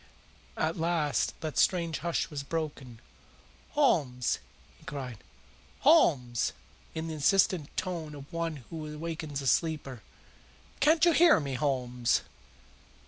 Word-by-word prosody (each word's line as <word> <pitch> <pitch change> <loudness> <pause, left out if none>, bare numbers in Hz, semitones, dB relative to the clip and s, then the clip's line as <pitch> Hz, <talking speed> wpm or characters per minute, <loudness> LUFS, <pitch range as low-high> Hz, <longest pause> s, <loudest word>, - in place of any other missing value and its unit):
At 160 +1 0
last 165 -3 0
that 155 -4 -2
strange 170 -5 +2
hush 170 +2 -1
was 145 -2 -4
broken. 140 -5 -5 0.7
"Holmes!" 145 - +2 0.4
he - - -21
cried. 135 -6 -6 0.6
"Holmes!" 140 - +4 0.4
in 160 0 -3
the 160 - -4
insistent 160 0 +2
tone 165 -5 -3
of 140 +2 -12
one 165 -5 -3
who 155 -2 -6
awakens 155 -3 -4
a - - -2
sleeper. 140 -5 0 0.8
"Can't 315 +3 +5
you 345 - +6
hear 330 -1 +6
me, 140 -3 -4
Holmes?" 125 -3 0
155 Hz, 120 wpm, -29 LUFS, 135-170 Hz, 0.8 s, you